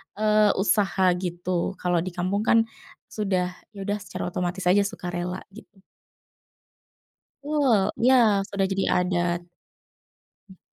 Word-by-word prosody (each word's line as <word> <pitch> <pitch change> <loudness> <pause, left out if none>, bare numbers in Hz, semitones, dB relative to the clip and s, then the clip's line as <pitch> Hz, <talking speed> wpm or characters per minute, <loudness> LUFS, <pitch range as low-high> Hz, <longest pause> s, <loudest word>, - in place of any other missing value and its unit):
eee, 215 0 +3
usaha 190 -2 +2
gitu, 175 +1 -2
kalau 180 -2 0
di 180 +1 -5
kampung 195 +4 -1
kan 225 0 +5 0.5
sudah 185 -4 -1 0.2
ya 195 - -6
udah 205 +1 -2
secara 180 -2 -6
otomatis 180 +1 -3
aja, 200 +3 +3
sukarela 180 0 -5
gitu. 200 -2 -16 1.6
Betul, 290 -5 +2 0.3
iya 255 +2 +6 0.3
sudah 195 -1 0
jadi 195 0 0 0.2
adat. 175 -1 0 1.1
Mmm. 190 - -16
190 Hz, 115 wpm, -25 LUFS, 180-205 Hz, 1.6 s, iya